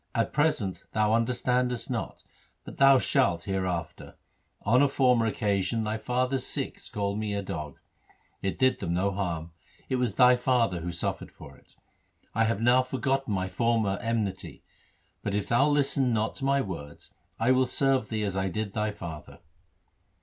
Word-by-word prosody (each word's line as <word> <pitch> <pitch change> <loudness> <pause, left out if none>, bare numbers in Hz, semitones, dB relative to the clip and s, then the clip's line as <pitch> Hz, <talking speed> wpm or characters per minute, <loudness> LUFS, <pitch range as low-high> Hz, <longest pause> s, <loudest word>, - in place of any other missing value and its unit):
At 115 -1 0
present 145 - 0
thou 110 0 +2
understandest 125 +1 0
not, - - -4 0.4
but - - -10
thou 135 0 +7
shalt 105 - +1
hereafter. 90 -4 -3 0.5
On 125 +5 +4
a 145 - +5
former 125 -4 +3
occasion 105 0 0
thy 110 +1 -2
father's 125 +2 -1
Sikhs - - -5
called 100 0 -2
me 105 -1 -2
a 100 - -2
dog. 75 -6 -6 0.6
It 95 - -2
did 130 -1 +2
them 85 -3 -2
no 100 +2 +1
harm 85 -4 -3 0.3
j - - -30
it 130 - +1
was 125 -1 -1
thy 125 -1 +6
father 120 -7 +1
who 85 +1 -4
suffered 85 - -3
for - - -13
it. - - -24 0.6
I 115 +1 +2
have 110 -2 0
now 120 +2 +5
forgotten 130 0 -1
my 95 -1 -1
former 110 -2 0
enmity; 110 -5 -3 0.6
but 100 - -2
if 105 - -1
thou 135 +5 +4
listen 140 -3 +2
not 110 -1 0
to 135 - -4
my 140 0 +3
words, 80 - -8 0.3
I 115 +3 +3
will 130 0 +3
serve 135 -3 +1
thee 110 -1 -2
as 100 -2 -2
I 95 0 0
did 105 +2 -4
thy 105 -1 0
father.' 85 -7 -8
110 Hz, 170 wpm, -28 LUFS, 95-125 Hz, 0.6 s, thou